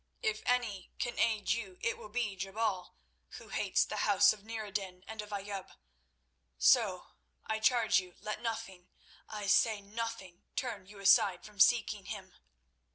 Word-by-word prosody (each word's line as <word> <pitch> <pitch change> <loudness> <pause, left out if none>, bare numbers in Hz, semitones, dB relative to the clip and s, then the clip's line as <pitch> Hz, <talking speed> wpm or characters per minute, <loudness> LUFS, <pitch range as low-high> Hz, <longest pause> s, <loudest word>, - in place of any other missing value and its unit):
If 435 -1 0
any 230 -7 0
can 240 - -3
aid 220 -3 +2
you, 205 -5 -2
it 230 - 0
will 210 - -11
be 215 -3 -1
Jebal, 195 0 -2 0.4
who - - -12
hates - - +1
the - - -5
Houses - - +5
of 210 -2 -14
Nur 220 0 -5
ed 200 - -11
din 185 -3 -4
and 220 -1 -5
of 210 - -10
Ayoub. 200 -1 -5 0.8
So, 65 - +3 0.4
I 220 0 -1
charge 230 -1 +4
you, 180 -1 -10
let 210 +1 -5
nothing—I 210 -1 -7
say 210 +2 +4
nothing—turn 205 0 -5
you 205 +1 -13
aside 195 -2 +4
from 210 -1 -14
seeking 210 -2 +4
him. 190 -2 -7
210 Hz, 155 wpm, -33 LUFS, 195-225 Hz, 0.8 s, Houses